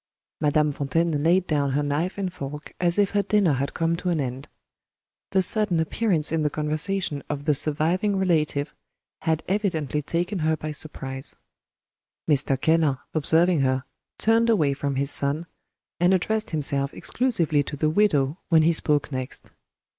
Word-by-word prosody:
Madame 150 0 +2
Fontaine 145 +2 -1
laid 175 +4 +3
down 145 -4 0
her 145 +2 +1
knife 150 +7 -2
and 190 -3 -3
fork 150 -1 -7
as 175 0 +1
if 200 -2 +2
her 205 - +2
dinner 200 -5 +2
had 140 +1 -3
come 165 0 0
to 180 +1 -3
an 170 -3 0
end. 130 +1 -4 0.8
The 190 -1 +2
sudden 210 -3 +1
appearance 160 -1 0
in 165 -1 0
the 150 - +1
conversation 155 +1 -2
of 145 -1 -3
the 150 0 +2
"surviving 160 +8 +2
relative," 155 -5 0 0.5
had 160 -3 -1
evidently 170 -8 -1
taken 175 +6 -2
her 160 0 +1
by 155 0 -5
surprise. 135 -3 -4 0.9
Mr. 140 -3 +2
Keller, 160 -3 +2 0.2
observing 165 +2 +2
her, 130 -1 +1 0.3
turned 225 +1 +2
away 155 -11 +3
from 140 0 -3
his 140 +1 +1
son, 145 +4 +2 0.5
and 175 +2 +4
addressed 220 +4 -1
himself 140 -3 -1
exclusively 170 - 0
to 145 +1 -6
the 155 +1 +1
widow 155 -5 +2
when 160 -2 +5
he 165 +2 +3
spoke 150 -2 +2
next. 130 -1 -6
155 Hz, 160 wpm, -24 LUFS, 145-180 Hz, 0.9 s, when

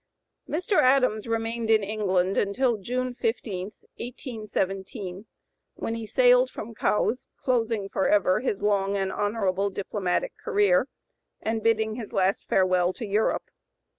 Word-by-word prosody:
Mr. 365 +5 +2
Adams 255 -5 +3
remained 225 0 -2
in 220 -2 +4
England 195 -3 0
until 235 +4 +1
June 250 +5 -2
15, 220 -6 -2 0.3
1817, 200 -5 -4 0.5
when 225 - -3
he 230 -1 -5
sailed 250 +2 +5
from 230 -1 -7
Cowes, 225 +3 0
closing 225 -5 0
forever 190 -1 +2
his 205 -6 -2
long 200 -1 +1
and 195 -1 -1
honorable 200 -2 0
diplomatic 190 -2 -2
career, 200 +3 +3 0.5
and 220 0 -2
bidding 220 0 +1
his 225 -4 -7
last 190 +1 +1
farewell 185 -1 +3
to 235 - -6
Europe. 210 +2 0
215 Hz, 125 wpm, -26 LUFS, 195-230 Hz, 0.5 s, sailed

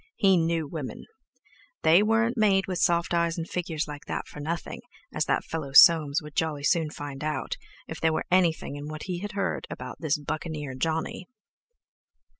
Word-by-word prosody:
He 195 -2 +4
knew 165 -2 +1
women; 145 -3 -6 0.8
they 165 +5 +6
weren't 225 +3 +2
made 200 -4 +3
with 185 -2 -3
soft 170 0 +2
eyes 170 0 +1
and 165 0 -4
figures 165 -3 -3
like 145 -1 -8
that - - -3
for - - -10
nothing, 165 +4 -4 0.3
as - - 0
that - - +1
fellow 150 -4 -5
Soames 155 -1 +7
would 150 -1 -11
jolly 155 -4 -1
soon 160 +1 +2
find 145 -1 -7
out, 155 0 -2 0.3
if - - -7
there 160 - +3
were 155 - -1
anything 170 -5 +2
in 145 +1 -7
what 155 0 -6
he 180 -2 -4
had 205 +2 -6
heard 195 -1 -2
about - - -7
this 155 -3 0
Buccaneer 150 -1 -5
Johnny. 160 +6 -2
160 Hz, 180 wpm, -27 LUFS, 150-175 Hz, 0.8 s, Soames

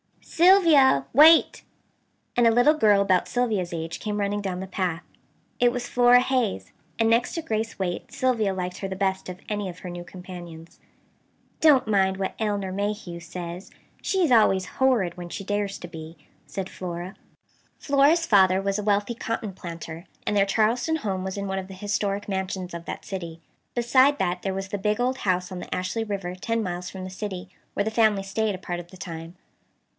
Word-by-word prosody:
"Sylvia! 330 - +5
Wait!" 315 +4 +7 0.7
and 240 -1 +5
a - - +6
little 245 +6 +5
girl 210 -9 +4
about 190 -2 +2
Sylvia's 220 -8 -1
age 165 0 -4
came 210 -1 -3
running 205 0 -1
down 185 -2 -3
the 190 - -4
path. 180 -3 -2 0.6
It 245 0 +4
was 245 0 -4
Flora 245 0 +5
Hayes; 250 - -1 0.3
and, 225 - +2
next 230 +1 +2
to 330 - -3
Grace 220 -2 -2
Waite, 180 -3 -3
Sylvia 235 -6 +1
liked 180 -1 -4
her 195 - -3
the 190 - -5
best 190 -1 -1
of 180 0 -7
any 205 -2 -2
of 180 0 -10
her 180 - -7
new 175 0 -7
companions. 175 -2 -11 0.8
"Don't 295 -5 +5
mind 190 -2 +2
what 190 -1 -2
Elinor 205 -3 -1
Mayhew 200 -3 -3
says. 175 +1 -7 0.3
She's 370 -8 +1
always 195 -5 +4
horrid 230 -10 +2
when 175 -1 -7
she 195 - -6
dares 205 0 -2
to 175 - -8
be," 160 -1 -10 0.3
said 190 -1 -4
Flora. 180 +1 -6 0.6
Flora's 290 +4 +3
father 190 - +5
was 195 +1 -1
a - - -3
wealthy 205 +2 +1
cotton 230 -3 -4
planter, 170 -2 -8 0.2
and 210 - 0
their 200 -1 +3
Charleston 230 +9 +1
home 195 -9 -3
was 190 +1 -4
in 200 - -3
one 190 0 -2
of 190 - -7
the 190 - -10
historic 205 0 -2
mansions 190 -2 -3
of 170 0 -7
that - - -6
city. 170 -4 -6 0.4
Beside 260 +4 +4
that 180 -1 -1
there 195 -1 -2
was 195 0 -4
the 205 - -3
big 210 +2 0
old 255 +2 0
house 180 -1 0
on 185 - -5
the - - -5
Ashley 185 +5 -2
River 195 -4 -4
ten 230 +5 -2
miles 180 -1 -4
from 190 -1 -8
the 185 - -6
city, 190 -2 -6 0.3
where 200 - +1
the 220 - -2
family 220 -3 +3
stayed 210 +1 -1
a - - -9
part 175 -2 -4
of 175 0 -10
the 185 - -13
time. 165 0 -8
195 Hz, 195 wpm, -25 LUFS, 180-225 Hz, 0.8 s, Wait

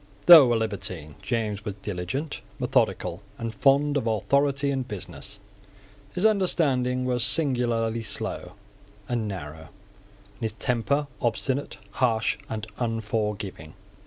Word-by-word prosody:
Though 155 -8 +10
a - - +3
libertine, 100 -8 -3
James 110 -4 -2
was 105 -3 -4
diligent, 105 - -4 0.2
methodical, 90 +1 0 0.2
and 115 -1 -4
fond 140 +2 +3
of 120 - -1
authority 140 +6 +2
and 130 -2 -2
business. 105 -1 -7 0.8
His 185 +3 0
understanding 140 -11 +2
was 125 -2 +1
singularly 120 -6 0
slow 110 - -3 0.5
and 120 -3 -1
narrow, 80 -5 -6
and 100 +1 -27
his 110 -2 -2
temper 125 +6 0 0.2
obstinate, 130 +3 -1
harsh, 115 -2 +1
and 110 -1 -4
unforgiving. 105 -7 -3
115 Hz, 115 wpm, -26 LUFS, 105-135 Hz, 0.8 s, Though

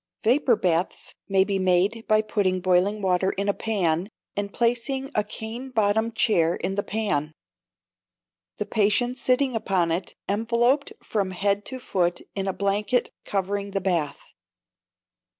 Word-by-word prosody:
Vapour 245 +1 +4
baths 180 -2 -1 0.2
may 195 -1 +4
be 195 0 -1
made 190 +5 +1
by 215 -1 +4
putting 195 -4 0
boiling 185 +3 +2
water 185 0 +2
in 200 +1 -2
a 200 - +3
pan, 185 -5 0 0.3
and 200 0 -2
placing 245 +4 0
a 210 - +2
cane 230 +5 -7
bottom 220 -1 +1
chair 175 -7 +2
in 190 - -3
the 205 - 0
pan, 200 -9 -1 1.2
the - - -2
patient 230 +4 +1
sitting 255 0 +2
upon 185 -6 +1
it, 175 +2 -3
enveloped 240 - +1
from 200 -3 -1
head 200 +2 0
to 260 - -6
foot 175 -7 0
in 195 -1 -3
a - - +2
blanket 205 +5 0
covering 200 +1 -2
the - - +2
bath. 170 -6 -1
200 Hz, 145 wpm, -25 LUFS, 185-225 Hz, 1.2 s, Vapour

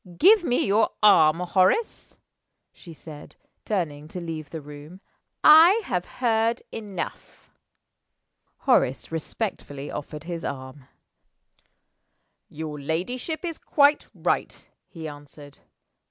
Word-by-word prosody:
"Give 405 +3 +6
me 245 -7 +1
your 210 +3 +2
arm, 165 -5 +6
Horace," 185 - 0 0.6
she 170 - -14
said, 155 -2 -12 0.3
turning 155 -8 -3
to 180 - -7
leave 160 -3 -6
the 160 - -6
room. 150 +4 -12 0.4
"I 330 +7 +8
have 180 -1 -2
heard 230 -1 0
enough." 205 -5 -8 1.1
Horace 130 +5 +1
respectfully 155 -4 -5
offered 150 +1 -7
his 170 -1 -6
arm. 130 0 -7 1.6
"Your 155 -1 -7
ladyship 245 - -3
is 330 -2 -5
quite 290 0 +2
right," - - -2 0.2
he 160 -3 -8
answered. 145 -1 -12
170 Hz, 105 wpm, -25 LUFS, 150-225 Hz, 1.6 s, I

